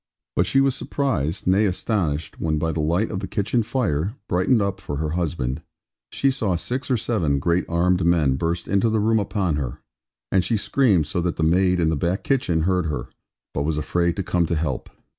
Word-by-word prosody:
But 90 - +2
she 135 - +4
was 135 -1 +3
surprised, 100 - -2
nay 100 +3 +3
astonished, 90 -5 -2
when 80 -1 0
by 80 +2 0
the 80 - -3
light 85 +8 +1
of 95 - -2
the 95 - -5
kitchen 105 +5 0
fire 105 - -1
(brightened 95 +7 +2
up 100 -1 -2
for 70 - -4
her 75 +1 -2
husband), 80 -5 -2 0.5
she 135 - +2
saw 110 -9 0
six 125 +11 -3
or 130 - +3
seven 90 -11 0
great 85 +5 +1
armed 90 +2 +2
men 80 -6 +3
burst 85 +4 -2
into 100 +3 +2
the 110 0 +1
room 110 +1 +3
upon 95 -6 -1
her; 65 -5 -3 0.5
and 95 -2 +3
she 115 +4 +1
screamed 100 - +2
so 85 +4 -2
that 85 0 -1
the 80 - -1
maid 90 +2 +3
in 80 -2 +2
the 80 - +1
back 90 +6 -1
kitchen 105 - +1
heard 90 0 +1
her, 70 -5 -4 0.4
but 70 - -1
was 75 +1 -1
afraid 85 +3 0
to 95 - -2
come 85 -1 +1
to 85 - 0
help. 75 -5 -2
90 Hz, 210 wpm, -23 LUFS, 80-105 Hz, 0.5 s, she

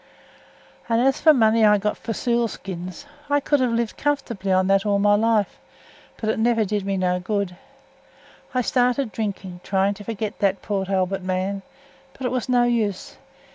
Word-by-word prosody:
"As 245 +4 +2
for 320 - +5
the - - +9
money 225 -1 +4
I 210 -1 +6
got 210 +1 -1
for - - -22
the 225 - 0
seal 235 -1 +1
skins, 185 +2 -7 0.2
I 290 0 +3
could 290 +1 +1
have 255 -1 +2
lived 230 -1 -1
comfortably 235 -9 -2
on 185 +1 +3
it 195 0 +3
all 205 -1 +1
my 205 +1 +4
life, 215 -1 +1 0.6
but 220 - -4
it - - -3
never 225 -1 +2
did 205 0 -2
me 195 -1 0
no 180 -1 +1
good. 200 -1 -2 1.0
I 255 - +1
started 250 0 +1
drinking, 195 -5 -4
trying 195 +1 +1
to 205 - -11
forget 215 -1 -4
that 195 -1 +1
Port 195 -2 -2
Albert 190 0 0
man, 185 +2 -2 0.5
but 265 - -11
it 250 - 0
was 255 -1 -2
no 245 -1 +4
use. 225 -5 -1
210 Hz, 185 wpm, -23 LUFS, 195-235 Hz, 1.0 s, the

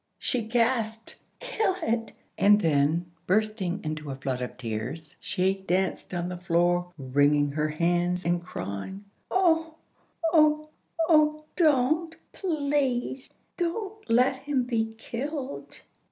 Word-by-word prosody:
She 250 - -1
gasped, 225 -1 0 0.2
"Kill 450 -6 0
it!" 230 -4 -1 0.2
and 205 +1 +5
then 155 0 +2 0.2
bursting 205 -1 0
into 155 -1 -4
a 135 - -3
flood 130 -1 -3
of 125 - -5
tears 125 +7 -5
she 185 0 +1
danced 190 -1 -1
on 175 -1 -2
the 180 -1 -5
floor, 175 0 +1
wringing 145 +2 +2
her 150 +1 0
hands 175 +3 0
and 175 0 +1
crying, 175 - -6 0.2
"Oh, 325 -3 +2 0.6
oh, 305 -1 +4 0.4
oh! 305 -1 +4
don't, 315 +1 +2 0.2
please, 280 -7 -1 0.3
don't 405 +5 -3
let 250 +3 +4
him 270 -1 -1
be 225 -2 -1
killed! 275 +4 -5
215 Hz, 120 wpm, -27 LUFS, -, 0.6 s, and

